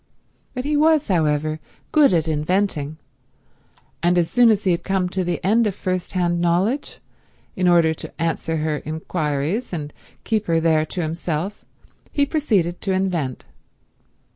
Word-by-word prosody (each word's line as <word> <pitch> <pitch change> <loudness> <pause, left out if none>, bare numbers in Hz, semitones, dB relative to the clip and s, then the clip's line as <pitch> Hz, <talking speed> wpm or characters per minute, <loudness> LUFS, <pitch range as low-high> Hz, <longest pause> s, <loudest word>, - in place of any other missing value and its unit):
But 250 - -3
he 300 +1 0
was, 310 -3 +3
however, 155 -3 +1 0.3
good 300 -6 +5
at 165 -3 +1
inventing; 155 -1 -1 1.0
and 175 +1 +2
as 170 -2 +1
soon 245 -1 +5
as 210 -2 +2
he 185 - +2
had 170 - -1
come 190 -2 0
to 190 +1 -2
an 175 - -2
end 220 +4 +3
of 200 - -2
first 185 -2 -3
hand 175 -2 +1
knowledge, 185 +11 0 0.6
in 185 -3 +1
order 170 -2 +4
to - - -9
answer 165 0 -1
her 155 -1 -1
inquires 155 - -2
and 150 -4 -5 0.3
keep 220 -2 -1
her 165 -1 +2
there 160 -1 +2
to 175 - -3
himself 165 +4 -3 0.5
he 285 - +2
proceeded 215 - 0
to 195 - -1
invent. 175 -9 -1
175 Hz, 155 wpm, -22 LUFS, 160-200 Hz, 1.0 s, good